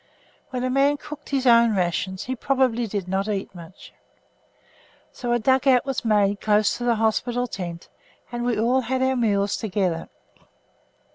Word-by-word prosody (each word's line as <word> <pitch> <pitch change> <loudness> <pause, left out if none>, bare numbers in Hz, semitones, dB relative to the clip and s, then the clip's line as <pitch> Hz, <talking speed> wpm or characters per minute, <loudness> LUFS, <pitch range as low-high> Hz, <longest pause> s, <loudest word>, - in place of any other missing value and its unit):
When 255 -1 -3
a 255 - 0
man 280 +2 +3
cooked 295 0 -10
his 270 -2 -1
own 235 -2 +5
rations 185 +1 -1
he 260 - -4
probably 255 -2 0
did 200 -3 -4
not 190 +2 -1
eat 200 -3 -3
much. 175 0 -13 1.2
So 240 -1 -4
a 240 - +3
dug 260 +3 +2
out 255 -1 +4
was 270 -2 -3
made 205 -3 +2
close 210 -1 +2
to - - -4
the 240 -1 +2
hospital 230 +3 0
tent, 175 -7 -7 0.4
and 240 0 -3
we 240 -3 0
all 245 +4 +2
had 260 +2 -1
our 260 0 +1
meals 205 -4 +1
together. 185 -6 -2
230 Hz, 165 wpm, -23 LUFS, 200-255 Hz, 1.2 s, own